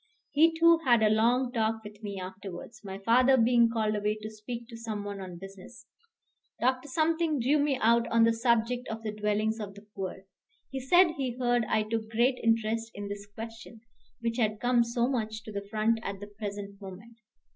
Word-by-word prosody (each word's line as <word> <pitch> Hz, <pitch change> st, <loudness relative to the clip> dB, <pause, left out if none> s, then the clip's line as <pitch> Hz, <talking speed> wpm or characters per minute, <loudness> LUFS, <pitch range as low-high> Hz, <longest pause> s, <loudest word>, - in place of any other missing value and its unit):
He, 325 Hz, +3 st, +4 dB
too, 335 Hz, 0 st, +6 dB
had 240 Hz, -7 st, +3 dB
a 215 Hz, -, +4 dB
long 240 Hz, +4 st, +2 dB
talk 220 Hz, -2 st, -1 dB
with 210 Hz, 0 st, -11 dB
me 200 Hz, -2 st, -5 dB
afterwards, 190 Hz, +3 st, -8 dB
my 195 Hz, -1 st, -6 dB
father 250 Hz, +6 st, +4 dB
being 235 Hz, 0 st, +4 dB
called 220 Hz, -2 st, 0 dB
away 210 Hz, +1 st, 0 dB
to 215 Hz, -, -5 dB
speak 230 Hz, +2 st, -7 dB
to 235 Hz, -, -9 dB
some 220 Hz, -3 st, -5 dB
one 200 Hz, -1 st, -6 dB
on 180 Hz, -2 st, -8 dB
business. 195 Hz, +5 st, -12 dB, 0.7 s
Dr. 255 Hz, +3 st, 0 dB, 0.5 s
drew 275 Hz, +5 st, +2 dB
me 285 Hz, -2 st, +1 dB
out 235 Hz, +1 st, +3 dB
on 230 Hz, 0 st, +3 dB
the 230 Hz, 0 st, +4 dB
subject 235 Hz, +1 st, +1 dB
of 225 Hz, 0 st, -6 dB
the 215 Hz, -, -2 dB
dwellings 210 Hz, +1 st, -1 dB
of 200 Hz, -2 st, -6 dB
the 205 Hz, +1 st, -14 dB
poor. 190 Hz, 0 st, -5 dB, 0.5 s
He 270 Hz, -, -3 dB
said 345 Hz, +7 st, +5 dB
he 255 Hz, -3 st, -3 dB
heard 245 Hz, -2 st, +1 dB
I 215 Hz, 0 st, +1 dB
took 220 Hz, 0 st, -3 dB
great 240 Hz, +3 st, +2 dB
interest 225 Hz, 0 st, +1 dB
in 205 Hz, 0 st, -6 dB
this 205 Hz, 0 st, -7 dB
question, 225 Hz, +1 st, -10 dB, 0.4 s
which 230 Hz, 0 st, -2 dB
had 215 Hz, -3 st, 0 dB
come 245 Hz, -1 st, +3 dB
so 235 Hz, +1 st, 0 dB
much 220 Hz, -4 st, -2 dB
to 215 Hz, -, -9 dB
the 200 Hz, -1 st, -5 dB
front 220 Hz, +1 st, +1 dB
at 200 Hz, -3 st, -5 dB
the 205 Hz, -, -7 dB
present 205 Hz, -1 st, -7 dB
moment. 205 Hz, +5 st, -11 dB
225 Hz, 195 wpm, -29 LUFS, 210-240 Hz, 0.7 s, too